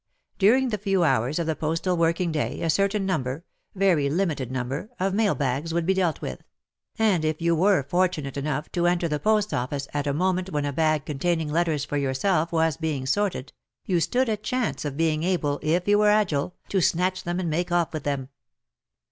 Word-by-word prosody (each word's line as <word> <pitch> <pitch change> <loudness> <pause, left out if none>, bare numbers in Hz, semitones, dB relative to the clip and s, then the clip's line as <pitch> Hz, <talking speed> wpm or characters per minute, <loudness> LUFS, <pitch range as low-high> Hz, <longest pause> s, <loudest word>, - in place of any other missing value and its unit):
During 250 +6 +4
the 210 -3 -2
few 195 -2 +1
hours 130 -2 +1
of 170 - -1
the 160 -1 -1
postal 165 +4 -1
working 170 +1 +1
day 155 -2 -2
a 165 - +2
certain 200 +3 +1
number 145 -3 -2
— - - -48
very 180 -7 +2
limited 150 -6 -1
number 130 - -3
— - - -37
of 190 +1 0
mail 210 0 +2
bags 145 +4 -2
would 170 -1 0
be 190 - +3
dealt 180 -4 0
with, - - -5 0.6
and 210 -8 +2
if 155 0 -1
you 170 0 +2
were 185 -2 +3
fortunate 155 -2 -1
enough 150 +1 -3
to 175 0 +1
enter 175 -1 +1
the 150 -2 -2
post 215 +1 +1
office 135 +3 -2
at 145 0 -1
a - - +2
moment 185 +3 0
when 150 -4 -1
a 145 - -2
bag 155 -1 +1
containing 160 +1 -1
letters 160 -3 0
for 145 - -3
yourself 155 +5 0
was 160 -3 +1
being 155 -5 -2
sorted, 180 -3 -1 0.3
you 180 -3 +1
stood 250 +9 +1
a 220 -1 0
chance 220 -3 -2
of 145 -1 -4
being 155 -1 +1
able, 160 -5 0
if 170 +4 0
you 205 0 +4
were 210 0 +5
agile, 180 -6 +1
to 195 - +1
snatch 185 +2 +1
them 175 +1 -2
and 170 -3 -2
make 175 +3 -1
off 175 -1 +1
with 155 - -3
them. 140 -2 -2
165 Hz, 210 wpm, -25 LUFS, 145-190 Hz, 0.6 s, were